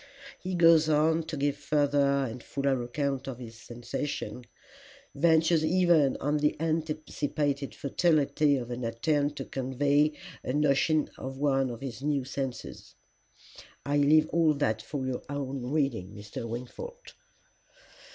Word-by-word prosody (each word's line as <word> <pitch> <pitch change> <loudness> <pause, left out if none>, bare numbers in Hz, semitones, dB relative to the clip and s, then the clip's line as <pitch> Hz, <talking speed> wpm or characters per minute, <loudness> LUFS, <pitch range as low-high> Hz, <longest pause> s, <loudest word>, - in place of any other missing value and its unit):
"He 185 0 -4
goes 165 -2 +6
on 160 +2 +3
to 160 -1 -5
give 140 0 0
further 140 -1 +2
and 120 +1 -7
fuller 140 -1 -1
account 135 +2 -2
of 130 -3 -5
his 120 -3 -9
sensations, 120 +2 -5 0.7
ventures 160 +1 +3
even 165 -4 +3
on 145 +2 0
the 150 0 0
anticipated 155 -3 -2
futility 145 -1 +2
of 125 -1 -5
an 120 +1 -4
attempt 145 +6 0
to - - -5
convey 140 +3 +1 0.3
a 125 - -2
notion 150 +1 +2
of 135 0 -6
one 135 -2 +1
of 120 0 -7
his 130 -3 -6
new 145 -1 0
senses. 135 -2 -6 0.9
I 145 +1 +1
leave 155 +2 +5
all 160 -2 +3
that 110 -7 0
for 135 +3 -4
your 130 -1 -3
own 135 -3 -4
reading, 120 -11 -1
Mr. 105 +3 -7
Wingfold. 475 - -8
140 Hz, 135 wpm, -29 LUFS, 130-155 Hz, 0.9 s, goes